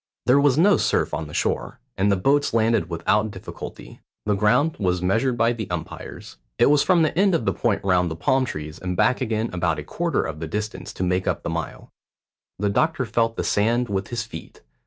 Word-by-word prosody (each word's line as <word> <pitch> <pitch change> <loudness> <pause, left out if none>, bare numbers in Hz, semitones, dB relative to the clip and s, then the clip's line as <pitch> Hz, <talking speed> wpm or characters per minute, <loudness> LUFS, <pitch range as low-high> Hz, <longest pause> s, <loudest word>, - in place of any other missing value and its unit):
There 125 +4 +5
was 140 -2 +3
no 195 +5 +5
surf - - 0
on 80 0 -3
the 75 - -11
shore, - - -2 0.2
and 100 +2 +2
the - - +4
boats 140 +7 +1
landed 110 -6 +2
without 105 +6 +1
difficulty. - - -9 0.3
The 105 - +2
ground 125 +10 +2
was 90 -3 +1
measured 115 +8 +1
by 115 +1 +3
the 110 -4 -6
umpires. - - -7 0.2
It 120 +4 +5
was 150 -1 +4
from 175 -3 +3
the 155 - 0
end 190 0 +3
of 165 - -1
the - - +1
point 115 -4 0
round 90 -2 +2
the 80 - -4
palm 130 - +1
trees 75 -6 -6
and 90 -1 -4
back 125 - +2
again 110 -2 -1
about 85 -2 0
a - - -5
quarter 170 -1 -1
of 80 -1 -5
the 80 - -4
distance 105 +5 -4
to - - -3
make 90 0 0
up - - -1
the - - -3
mile. - - -5 0.7
The 105 +1 0
doctor 155 +2 +1
felt 115 0 0
the - - -1
sand 120 +4 +1
with 95 -1 -2
his 120 -1 -3
feet. 80 - -11
110 Hz, 220 wpm, -23 LUFS, 90-130 Hz, 0.7 s, There